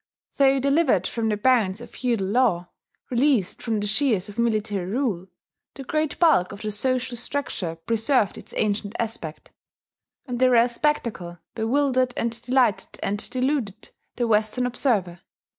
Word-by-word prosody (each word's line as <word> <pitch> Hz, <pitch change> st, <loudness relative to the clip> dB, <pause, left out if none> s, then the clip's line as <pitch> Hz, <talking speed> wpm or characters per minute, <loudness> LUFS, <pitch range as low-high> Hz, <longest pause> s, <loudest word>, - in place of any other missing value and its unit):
Though 275 Hz, -1 st, +4 dB
delivered 275 Hz, -, +2 dB
from 225 Hz, +1 st, -1 dB
the 210 Hz, -, 0 dB
bonds 215 Hz, -4 st, +2 dB
of 240 Hz, -, -11 dB
feudal 235 Hz, -6 st, -1 dB
law, 195 Hz, -5 st, +1 dB, 0.4 s
released 245 Hz, -6 st, +1 dB
from 225 Hz, -3 st, -1 dB
the 205 Hz, -, -2 dB
shears 215 Hz, -3 st, +1 dB
of 205 Hz, +2 st, -9 dB
military 215 Hz, -4 st, 0 dB
rule, 210 Hz, -6 st, -1 dB, 0.5 s
the 270 Hz, -, -7 dB
great 310 Hz, +2 st, -1 dB
bulk 300 Hz, -, +4 dB
of 200 Hz, +2 st, -9 dB
the 215 Hz, -, -2 dB
social 255 Hz, +3 st, -1 dB
structure 225 Hz, -9 st, -3 dB
preserved 225 Hz, -, +1 dB
its -, -, -10 dB
ancient 205 Hz, 0 st, -1 dB
aspect; 215 Hz, -9 st, -4 dB, 0.7 s
and 245 Hz, -3 st, -4 dB
the 255 Hz, 0 st, +5 dB
rare 240 Hz, 0 st, +5 dB
spectacle 235 Hz, -10 st, -2 dB, 0.2 s
bewildered 255 Hz, +2 st, +1 dB
and 230 Hz, 0 st, -2 dB
delighted 250 Hz, -4 st, +1 dB
and 205 Hz, +1 st, -2 dB
deluded 250 Hz, -5 st, -2 dB, 0.3 s
the 240 Hz, -, 0 dB
Western 220 Hz, +3 st, +1 dB
observer. 215 Hz, -9 st, 0 dB
230 Hz, 145 wpm, -24 LUFS, 205-255 Hz, 0.7 s, the